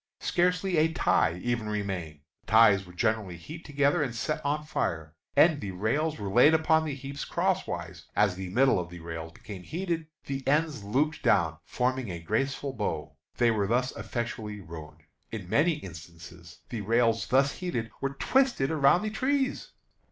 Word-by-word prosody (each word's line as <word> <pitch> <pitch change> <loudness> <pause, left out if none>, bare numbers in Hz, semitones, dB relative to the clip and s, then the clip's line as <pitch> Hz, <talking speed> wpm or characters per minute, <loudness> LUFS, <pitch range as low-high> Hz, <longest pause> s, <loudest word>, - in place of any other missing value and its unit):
Scarcely 180 0 +1
a 160 +1 +3
tie 90 - +2
even 120 -3 -1
remained. 95 -8 -4 0.2
The - - -37
ties 105 -4 +6
were 90 - -13
generally 110 -3 -1
heaped 155 - -10
together, 145 +2 +2
and 130 -5 -2
set 155 +6 -2
on 150 +1 -1
fire, 80 - -2 0.2
and 160 -3 +5
the 100 - -4
rails 140 - -1
were 100 - -5
laid 125 +10 +6
upon 160 0 +3
the 145 -3 -3
heaps 140 +1 -6
cross - - 0
wise. - - -6
As 105 -3 +3
the 95 0 -6
middle 130 +2 +3
of 85 -1 -5
the 90 0 -10
rails 80 -1 -6
became 100 +3 -10
heated, 165 - -3 0.2
the 135 0 -3
ends 150 -4 +1
lopped 145 +10 0
down, 80 - +2
forming 130 -2 -1
a 85 -2 -5
graceful 135 +10 -1
bow. 105 - -3 0.2
They 120 -1 +4
were 105 -3 0
thus 125 +4 0
effectually 115 -3 -4
ruined. 80 -4 -10 0.3
In 105 -6 -6
many 155 - +3
instances 85 - -11
the 115 -3 -4
rails 115 +2 +2
thus 135 +2 +2
heated 170 -12 -3
were 135 0 -2
twisted 260 - +2
around 155 +4 +4
the 215 - -2
trees. 265 +4 0
120 Hz, 175 wpm, -28 LUFS, 95-150 Hz, 0.3 s, ties